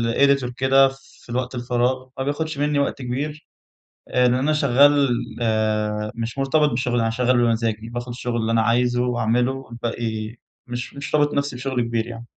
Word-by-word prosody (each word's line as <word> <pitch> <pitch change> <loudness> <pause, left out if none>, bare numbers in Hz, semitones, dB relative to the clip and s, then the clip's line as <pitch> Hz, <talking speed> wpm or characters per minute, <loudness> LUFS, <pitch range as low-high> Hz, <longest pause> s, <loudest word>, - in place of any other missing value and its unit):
editor 140 -3 +3
كده 135 +1 +5
في 135 -2 -18
الوقت 125 +1 -2
الفراغ. 125 +1 -1
ما 130 - -1
بياخدش 145 +2 -2
مِنّي 145 0 +1
وقت 140 -1 -1
كبير. 145 +5 -4 0.6
لأن 125 -1 +3
أنا 135 +5 +1
شغّال 140 0 +4 0.3
آآ، 105 -1 0
مش 115 +2 -4
مرتبط 145 +2 +2
بالشغل 120 -1 0
أنا 115 - +1
شغّال 125 +2 +1
بمزاجي. 115 -2 0
باخد 120 +1 -5
الشغل 120 0 -4
اللي 115 0 0
أنا 115 0 +3
عايزه 120 +2 +2
وأعمله، 120 0 +1
والباقي 115 -3 -4 0.3
مش 120 0 -5
مش 140 +2 -3
رابط 145 -1 +2
نفسي 140 -2 -1
بشغل 130 0 -2
كبير 115 -1 -1
يعني. 115 0 -8
125 Hz, 165 wpm, -22 LUFS, 115-135 Hz, 0.6 s, كده